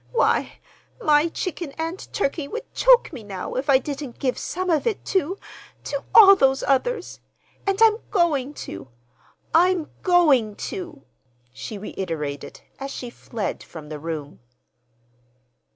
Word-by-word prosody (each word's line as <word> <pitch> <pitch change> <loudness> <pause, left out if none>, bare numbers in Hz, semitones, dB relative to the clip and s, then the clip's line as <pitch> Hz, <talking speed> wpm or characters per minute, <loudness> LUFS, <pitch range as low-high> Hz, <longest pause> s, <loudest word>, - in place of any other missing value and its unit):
Why, 485 - +2 0.5
my 305 -6 +3
chicken 340 -4 -4
and 330 +3 -5
turkey 285 -5 -1
would 465 - -7
choke - - +5
me 250 - -7
now 195 -3 -6
if 265 +3 -3
I 270 - +7
didn't 275 -1 -6
give 255 -2 0
some 370 +1 -4
of 320 +7 +1
it 440 - -2
to—to 365 -5 -4
all 395 -3 +10
these 270 -6 +2
others. 380 - 0 0.5
And 390 0 +1
I'm 440 -1 +6
going 295 - +1
to—I'm 130 - -2
going 290 - +4
to!" 335 - -6 0.5
she 210 - -7
reiterated, 165 -8 -5 0.2
as 275 0 -5
she 245 -3 -6
fled 220 -4 -5
from 155 -3 -11
the 155 -1 -6
room. 155 -2 -6
285 Hz, 130 wpm, -23 LUFS, -, 0.5 s, all